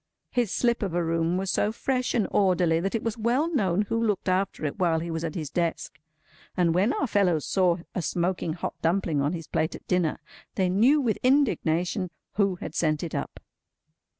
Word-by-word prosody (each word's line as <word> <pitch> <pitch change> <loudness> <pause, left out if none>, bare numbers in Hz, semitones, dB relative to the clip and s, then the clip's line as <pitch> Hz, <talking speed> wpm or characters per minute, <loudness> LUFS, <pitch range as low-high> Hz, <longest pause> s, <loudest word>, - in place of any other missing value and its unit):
His 240 -5 0
slip 235 -1 +1
of 190 -5 -2
a 175 - +1
room 165 +1 0
was 190 0 -1
so 210 - +1
fresh 255 +2 -1
and 220 -4 +2
orderly 180 -4 +3
that 195 +5 -2
it 225 - -2
was 230 0 -3
well 260 +9 +1
known 200 - +2
who 230 +2 -1
looked 210 -4 -1
after 185 -3 0
it 145 - -3
while 170 -3 +2
he 170 +1 -4
was 165 0 -3
at 160 -2 -4
his 155 -5 -4
desk; 165 -3 -2 0.6
and 170 -2 +3
when 195 +7 +3
our 280 - 0
fellows 185 - +1
saw 180 -3 +2 0.2
a 185 - -2
smoking 175 -1 -1
hot 170 - -4
dumpling 165 -4 +1
on 145 +4 0
his 165 -2 -5
plate 155 - -1
at - - -12
dinner, 180 -4 +1 0.4
they 185 -2 +1
knew 235 +11 +4
with 235 -6 0
indignation 185 - +1 0.2
who 195 -3 +1
had - - -7
sent 155 -1 0
it 165 - -5
up. - - -4
185 Hz, 205 wpm, -26 LUFS, 165-215 Hz, 0.6 s, knew